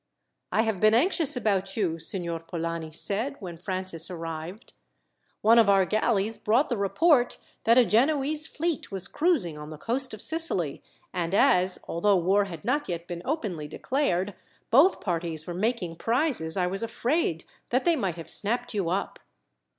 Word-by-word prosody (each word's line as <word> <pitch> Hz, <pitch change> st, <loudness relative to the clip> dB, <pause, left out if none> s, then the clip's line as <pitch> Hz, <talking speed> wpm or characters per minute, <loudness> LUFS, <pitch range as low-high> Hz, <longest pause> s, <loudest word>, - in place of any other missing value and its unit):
"I 220 Hz, -, +2 dB
have 220 Hz, -4 st, -2 dB
been 215 Hz, +2 st, +5 dB
anxious 315 Hz, 0 st, +3 dB
about 195 Hz, -4 st, -1 dB
you," 170 Hz, -6 st, -1 dB
Signor 170 Hz, 0 st, -3 dB
Polani 165 Hz, -1 st, -5 dB
said 210 Hz, -, -1 dB
when 180 Hz, -4 st, -7 dB
Francis 185 Hz, -1 st, -1 dB
arrived. 165 Hz, +4 st, -7 dB, 0.7 s
"One 230 Hz, +2 st, +6 dB
of 220 Hz, -3 st, +5 dB
our 195 Hz, -1 st, +4 dB
galleys 215 Hz, +1 st, 0 dB
brought 240 Hz, +8 st, +2 dB
the 240 Hz, -, -1 dB
report 245 Hz, -, +2 dB, 0.3 s
that 230 Hz, +2 st, +5 dB
a 250 Hz, -, +6 dB
Genoese 290 Hz, +7 st, +2 dB
fleet 330 Hz, -5 st, -3 dB
was 195 Hz, -1 st, +2 dB
cruising 255 Hz, -, 0 dB
on 150 Hz, 0 st, -8 dB
the 155 Hz, -, -8 dB
coast 255 Hz, -, -2 dB
of 210 Hz, -, -11 dB
Sicily, 315 Hz, -, +1 dB, 0.3 s
and 175 Hz, 0 st, -2 dB
as, 185 Hz, -7 st, +4 dB
although 195 Hz, +4 st, +2 dB
war 195 Hz, +4 st, +2 dB
had 170 Hz, -5 st, -9 dB
not 290 Hz, +1 st, 0 dB
yet 170 Hz, -1 st, -4 dB
been 175 Hz, -1 st, -6 dB
openly 210 Hz, -, -3 dB
declared, 205 Hz, -, -1 dB, 0.4 s
both 305 Hz, +11 st, +5 dB
parties 165 Hz, -3 st, -3 dB
were 175 Hz, -, -5 dB
making 185 Hz, -3 st, -2 dB
prizes, 230 Hz, -, 0 dB
I 180 Hz, -, +2 dB
was 195 Hz, +2 st, -1 dB
afraid 230 Hz, -, -1 dB, 0.2 s
that 255 Hz, +2 st, 0 dB
they 340 Hz, -1 st, +4 dB
might 195 Hz, -, -2 dB
have 165 Hz, -1 st, -9 dB
snapped 245 Hz, +4 st, -3 dB
you 195 Hz, -5 st, -1 dB
up." 190 Hz, +3 st, -3 dB
200 Hz, 165 wpm, -26 LUFS, 170-245 Hz, 0.7 s, One